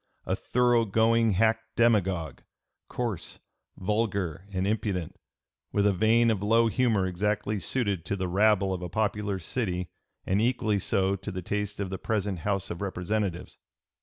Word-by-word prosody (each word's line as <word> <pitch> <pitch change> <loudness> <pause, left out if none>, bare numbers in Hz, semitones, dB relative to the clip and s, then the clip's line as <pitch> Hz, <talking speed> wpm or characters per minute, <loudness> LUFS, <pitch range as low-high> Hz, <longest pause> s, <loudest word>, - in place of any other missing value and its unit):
a - - 0
thorough 120 -1 +2
going 115 +1 +3
hack 110 +3 +3 0.2
demagogue, 95 - +1 0.5
coarse, 115 -8 -4 0.4
vulgar, 100 -3 -1
and 95 -1 -1
impudent, 100 -5 -2 0.6
with 100 -1 +1
a 100 - +4
vein 115 +4 +4
of 105 -3 -1
low 115 +3 +4
humor 110 -3 +2
exactly 105 +3 -1
suited 100 -7 -1
to 100 - -2
the 95 -1 -2
rabble 100 +1 +3
of 90 - -4
a 90 - -5
popular 105 -1 -1
city 90 -1 -3 0.3
and 95 +3 +1
equally 110 -4 +1
so 95 0 +1
to 95 0 -7
the 90 -1 -5
taste 105 +2 -3
of 100 -2 -3
the 95 - -4
present 100 -4 -1
House 100 +2 -2
of 85 - -6
Representatives." 95 -1 -3
100 Hz, 155 wpm, -28 LUFS, 95-110 Hz, 0.6 s, a